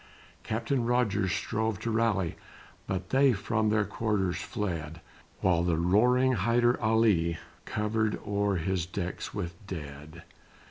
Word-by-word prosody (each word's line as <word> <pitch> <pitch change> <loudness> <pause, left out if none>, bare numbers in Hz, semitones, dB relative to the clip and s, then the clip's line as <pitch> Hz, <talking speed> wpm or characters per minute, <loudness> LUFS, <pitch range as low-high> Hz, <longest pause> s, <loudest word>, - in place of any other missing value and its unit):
Captain 115 +3 -1
Rogers 110 -5 +1
strove 110 +4 -1
to 115 - -2
rally 110 -6 +1 0.5
But 95 -1 -3
they 135 -1 +5
from 110 +1 0
their 110 -1 +2
quarters 100 -3 -1
fled, 85 -8 -4 0.4
While 90 -3 +3
the 85 -2 +1
roaring 125 +9 +3
Hyder 120 +3 +2
Ali 110 -7 +3 0.3
Covered 110 0 -1
o'er 100 -1 0
his 90 0 -1
decks 90 -1 -4
with 85 0 -3
dead. 75 -1 -8
105 Hz, 125 wpm, -29 LUFS, 90-115 Hz, 0.5 s, they